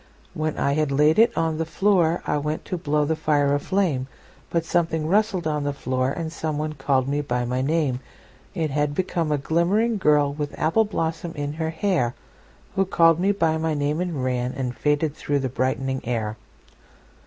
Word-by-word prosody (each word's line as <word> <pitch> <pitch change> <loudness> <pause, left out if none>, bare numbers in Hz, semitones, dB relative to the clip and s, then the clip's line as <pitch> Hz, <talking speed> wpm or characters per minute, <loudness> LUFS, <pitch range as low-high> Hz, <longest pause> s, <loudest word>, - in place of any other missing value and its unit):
When 155 0 -2
I 140 - +1
had 150 -1 0
laid 150 +6 +4
it 230 +1 +6
on 160 -1 0
the - - +1
floorI 170 -4 +1
went 150 +1 -3
to - - -3
blow 150 -3 0
the 160 +2 0
fire 145 -2 +2
a 145 - +2
flame, 155 -7 0 0.4
But 170 -1 0
something 160 -2 0
rustled 195 0 +1
on 150 -2 0
the 145 0 -1
floor, 130 -1 -1
And 160 +3 -4
someone 155 -1 -2
called 135 -2 0
me 145 +1 0
by 125 -3 -1
my 125 +1 -1
name:It 140 +2 -3
had 145 0 0
become 170 -3 -1
a 150 - +2
glimmering 190 +10 +1
girlWith 145 -3 +1
apple 165 +8 +2
blossom 165 -4 -3
in 145 0 -3
her 160 0 -2
hairWho 180 +3 -3
called 165 -2 +5
me 195 +3 +3
by 165 -5 +1
my 160 -1 0
name 145 +3 0
and 180 -2 -2
ranAnd 125 -1 -2
faded 150 +4 0
through 145 -1 -1
the 135 -2 -1
brightening 130 +1 -1
air. 110 -3 -2
150 Hz, 175 wpm, -24 LUFS, 140-165 Hz, 0.4 s, it